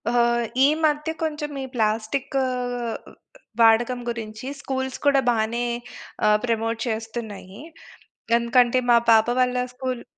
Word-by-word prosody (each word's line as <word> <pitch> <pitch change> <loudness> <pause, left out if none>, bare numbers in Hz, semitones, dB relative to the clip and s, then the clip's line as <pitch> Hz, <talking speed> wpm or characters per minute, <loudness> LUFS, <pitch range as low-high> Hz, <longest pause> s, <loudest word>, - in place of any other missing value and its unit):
ఆహా! 240 0 +3 0.4
ఈ - - +6 0.2
మధ్య 300 0 +1
కొంచెం 300 -1 -3
ఈ - - -4
ప్లాస్టిక్కూ 225 +4 -1 1.2
వాడకం 230 +2 +4
గురించి, 225 0 -6 0.2
స్కూల్స్ 265 -1 -3
కూడా 280 -1 +4
బానే 235 +1 0 0.6
ఆహ్, 210 0 +5
ప్రమోట్ 225 -1 -1
చేస్తున్నాయి. 220 -4 -6 0.8
ఎందుకంటే, 240 +1 +3
మా 235 - +7
పాప 220 0 +5
వాళ్ళ 250 0 +2 0.2
స్కూలు 255 -1 -4
235 Hz, 110 wpm, -23 LUFS, 225-260 Hz, 1.2 s, మా